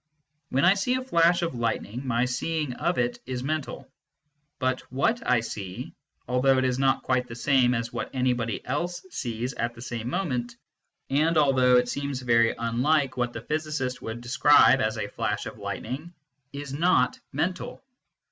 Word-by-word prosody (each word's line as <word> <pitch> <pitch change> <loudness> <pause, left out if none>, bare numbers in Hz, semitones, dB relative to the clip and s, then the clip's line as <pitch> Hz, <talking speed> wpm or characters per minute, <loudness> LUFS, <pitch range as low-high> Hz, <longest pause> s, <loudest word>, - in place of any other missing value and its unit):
When 135 +2 +2
I 185 - +7
see 200 +6 0
a 255 - -2
flash 170 -6 +3
of 170 - -1
lightning, 120 +1 -3
my 120 0 +2
seeing 150 +2 -2
of 170 +7 -1
it 120 0 0
is 125 -1 -3
mental, 155 +1 -3 0.7
but 130 -1 0
what 225 - +1
I 125 -2 +4
see, 100 -5 -6 0.3
although 130 +2 +3
it 130 - +2
is 130 0 0
not 135 0 +2
quite 125 -1 0
the 115 - -8
same 125 -1 +3
as 115 0 -3
what 115 -2 -3
anybody 125 -4 -1
else 175 +7 -3
sees 120 +1 -3
at 120 0 -3
the 115 - -11
same 120 -1 -4
moment, 125 -7 -2 0.6
and 155 +4 +2
although 130 -4 +5
it 125 0 +2
seems 140 +1 -3
very 115 -2 +3
unlike 130 +5 +1
what 120 -1 -1
the 115 - -7
physicist 150 -2 -3
would 115 +1 -6
describe 135 +1 +5
as 110 +1 0
a 105 -1 -2
flash - - -2
of - - -8
lightning, 150 +9 -5 0.4
is 140 -1 -6
not 145 -5 +2
mental. 175 - -3
130 Hz, 170 wpm, -26 LUFS, 120-150 Hz, 0.7 s, I